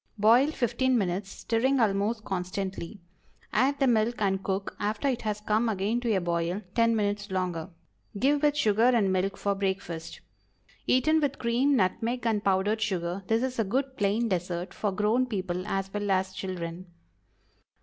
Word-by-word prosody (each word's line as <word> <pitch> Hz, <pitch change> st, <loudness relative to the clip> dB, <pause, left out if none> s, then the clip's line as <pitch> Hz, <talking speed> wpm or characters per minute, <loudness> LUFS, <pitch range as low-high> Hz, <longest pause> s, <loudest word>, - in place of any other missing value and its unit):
Boil 230 Hz, +6 st, +5 dB
fifteen 260 Hz, -1 st, +1 dB
minutes, 190 Hz, -1 st, -1 dB
stirring 250 Hz, +7 st, 0 dB
almost 215 Hz, +1 st, +1 dB
constantly. 190 Hz, +1 st, -4 dB, 0.5 s
Add 265 Hz, +6 st, +2 dB
the 275 Hz, -, +3 dB
milk 235 Hz, -1 st, +2 dB
and 195 Hz, -2 st, 0 dB
cook, 195 Hz, 0 st, -3 dB
after 210 Hz, +6 st, -1 dB
it 255 Hz, -3 st, 0 dB
has 210 Hz, -1 st, -3 dB
come 215 Hz, +2 st, +1 dB
again 210 Hz, +3 st, 0 dB
to 235 Hz, -2 st, 0 dB
a -, -, +2 dB
boil, 175 Hz, +3 st, -1 dB
ten 230 Hz, -1 st, +3 dB
minutes 205 Hz, -1 st, -1 dB
longer. 185 Hz, -3 st, -2 dB, 0.5 s
Give 280 Hz, +6 st, +2 dB
with 295 Hz, -1 st, +2 dB
sugar 220 Hz, -6 st, +2 dB
and 230 Hz, -6 st, +4 dB
milk 190 Hz, +1 st, 0 dB
for 200 Hz, -, 0 dB
breakfast. 190 Hz, -4 st, -3 dB, 0.7 s
Eaten 310 Hz, +5 st, +3 dB
with 285 Hz, -1 st, 0 dB
cream, 255 Hz, +4 st, +2 dB
nutmeg, 230 Hz, +4 st, 0 dB
and 215 Hz, -2 st, +1 dB
powdered 200 Hz, +3 st, +1 dB
sugar, 185 Hz, -2 st, -1 dB
this 225 Hz, +3 st, +2 dB
is 260 Hz, -2 st, -3 dB
a -, -, +4 dB
good 260 Hz, +6 st, -1 dB
plain 210 Hz, +3 st, +1 dB
dessert 180 Hz, -2 st, -2 dB
for 210 Hz, -, -1 dB
grown 215 Hz, +6 st, +1 dB
people 185 Hz, -4 st, -3 dB
as 195 Hz, -1 st, -2 dB
well 205 Hz, -1 st, -2 dB
as 190 Hz, 0 st, +1 dB
children. 180 Hz, -1 st, -5 dB
210 Hz, 165 wpm, -28 LUFS, 190-235 Hz, 0.7 s, Boil